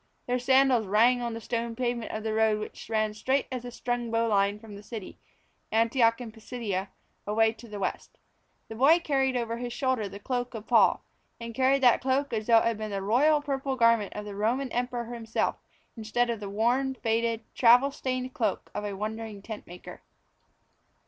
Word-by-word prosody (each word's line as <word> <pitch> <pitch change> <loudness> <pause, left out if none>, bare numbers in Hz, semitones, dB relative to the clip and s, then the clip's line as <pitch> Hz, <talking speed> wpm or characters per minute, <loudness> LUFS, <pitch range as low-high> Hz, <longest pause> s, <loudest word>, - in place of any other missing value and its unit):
Their 250 0 0
sandals 260 -3 +3
rang 235 +5 +4
on 235 -1 -3
the - - -5
stone 230 0 -3
pavement 240 -1 -2
of 215 - -5
the 220 -1 -2
road 220 -1 +2
which 215 - -8
ran 215 -1 0
straight 260 +6 0
as 250 -2 -4
a 245 - -6
strung 240 0 -3
bowline 210 -3 +1
from 210 -1 -12
the 200 - -10
city, 210 -2 -8 0.5
Antioch 230 +1 +3
in 240 -3 -7
Pisidia, 215 -4 -4 0.4
away 220 +1 +3
to 230 +1 -14
the 210 -2 -7
west. 190 - -4 0.5
The - - -8
boy 275 +9 +5
carried 270 -5 0
over 230 -1 -2
his 240 0 -5
shoulder 255 -6 -1
the 200 - -9
cloak 245 +3 -3
of 220 -1 -7
Paul, - - +4 0.3
and 230 0 -7
carried 265 +2 +2
that 245 -2 +5
cloak 265 +1 0
as 215 -1 -2
though 230 -1 +6
it - - +3
had 230 -2 0
been 215 0 -4
the 195 -1 -3
royal 290 +9 +3
purple 275 -2 -2
garment 230 -4 +3
of 210 - -5
the 205 - -7
Roman 240 +6 -1
Emperor 245 -1 -3
himself 225 -1 -2 0.4
instead 235 +2 0
of 230 - -4
the 205 -1 -6
worn, 245 +6 +1
faded, 230 -1 -1
travel 250 +3 +5
stained 255 -2 -3
cloak 215 -6 -2
of - - -4
a 205 -1 -4
wandering 215 -1 -5
tent 220 -1 -8
maker. 175 +1 -11
230 Hz, 195 wpm, -28 LUFS, 215-250 Hz, 0.5 s, though